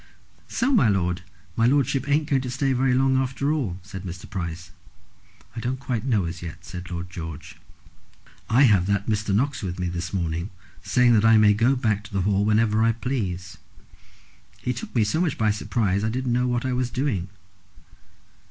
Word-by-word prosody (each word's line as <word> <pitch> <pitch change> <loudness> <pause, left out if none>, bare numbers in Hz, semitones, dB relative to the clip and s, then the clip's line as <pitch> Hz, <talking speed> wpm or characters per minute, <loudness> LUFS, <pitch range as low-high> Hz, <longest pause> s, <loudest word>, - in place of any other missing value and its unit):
"So, 255 +4 0
my 205 - +4
lord, 90 -3 0 0.3
his 115 +1 +3
lordship 140 0 +1
ain't 150 +2 +2
going 135 -3 +2
to 130 - -5
stay 135 +2 0
very 130 0 +2
long 130 0 +3
after 135 +3 0
all," 115 - -2
said 95 -1 -8
Mr. 90 -1 -8
Price. 85 -3 -5 0.8
"I - - -4
don't 125 +3 -2
quite 125 -5 -3
know 110 -9 +1
as 85 +1 -5
yet," 85 0 -8
said 90 -1 -8
Lord 90 0 -5
George. 80 -4 -8 0.9
"I 125 +5 +5
have 100 -8 +4
had 100 -1 0
Mr. 105 -2 -1
Knox 130 +7 +1
with 90 -2 -4
me 90 -1 -2
this 90 +1 -4
morning, 85 0 -2 0.3
saying 125 -1 +3
that 110 -2 +4
I 115 0 +6
may 105 -1 +6
go 120 +6 +3
back 110 -5 0
to 105 - -13
the 95 - +1
Hall 100 0 +2
whenever 110 +1 +2
I 115 0 +4
please. 95 -7 -4 1.0
He 125 - -2
took 120 - -8
me 115 - +4
so 105 +11 0
much 165 -6 0
by 110 -1 +2
surprise, 105 -2 0
I 110 - +1
didn't 125 +1 -1
know 125 +1 +1
what 120 0 -1
I 130 - 0
was 125 0 0
doing." 125 -10 -1
110 Hz, 195 wpm, -24 LUFS, 95-130 Hz, 1.0 s, I